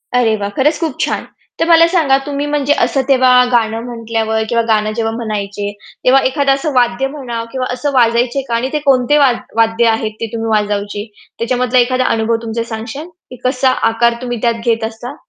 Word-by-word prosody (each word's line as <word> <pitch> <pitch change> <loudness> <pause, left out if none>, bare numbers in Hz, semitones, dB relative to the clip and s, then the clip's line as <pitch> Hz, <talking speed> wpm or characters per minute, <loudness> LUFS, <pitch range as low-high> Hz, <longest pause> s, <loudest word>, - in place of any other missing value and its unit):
अरे, 225 -3 +3
वाह! 200 0 -3
खरंच 300 +3 +2
खूप 320 -6 -2
छान. - - -1 0.3
तर 330 - +1
मला 335 0 +7
सांगा, 315 -7 +2
तुम्ही 285 0 -3
म्हणजे 290 -1 +1
असं 270 - +1
तेव्हा 255 -2 +4 0.2
गाणं 225 -1 +1
म्हटल्यावर 225 -2 -2
किंवा 235 -1 +2
गाणं 215 -1 +1
जेव्हा 225 -1 -1
म्हणायचे, 205 -3 -4 0.3
तेव्हा 265 +2 +5
एखादं 275 0 +1
असं 275 +1 -2
वाद्य 245 +1 +1
म्हणा 250 -5 -5
किंवा 255 -1 -3
असं 285 +3 -2
वाजवायचे 240 +2 +2
का? 235 - -1
आणि 250 +3 -1
ते 300 - +1
कोणते 270 +2 +3
वा 275 -3 +5 0.3
वाद्य 225 +1 +3
आहेत 220 -1 0
ते 230 - -1
तुम्ही 225 0 -3
वाजवायचे 205 -1 -1 0.3
त्याच्यामधला 250 +1 +1
एखादा 255 +1 +1
अनुभव 225 +1 +1
तुमचा 230 0 -3
सांगाल, 230 +8 -6 0.2
की 255 - -9
कसा 260 +1 +2 0.2
आकार 235 +1 +2
तुम्ही 245 -1 -3
त्यात 235 -1 +2
घेत 230 -1 +1
असता? 230 +5 -6
240 Hz, 190 wpm, -15 LUFS, 225-270 Hz, 0.3 s, मला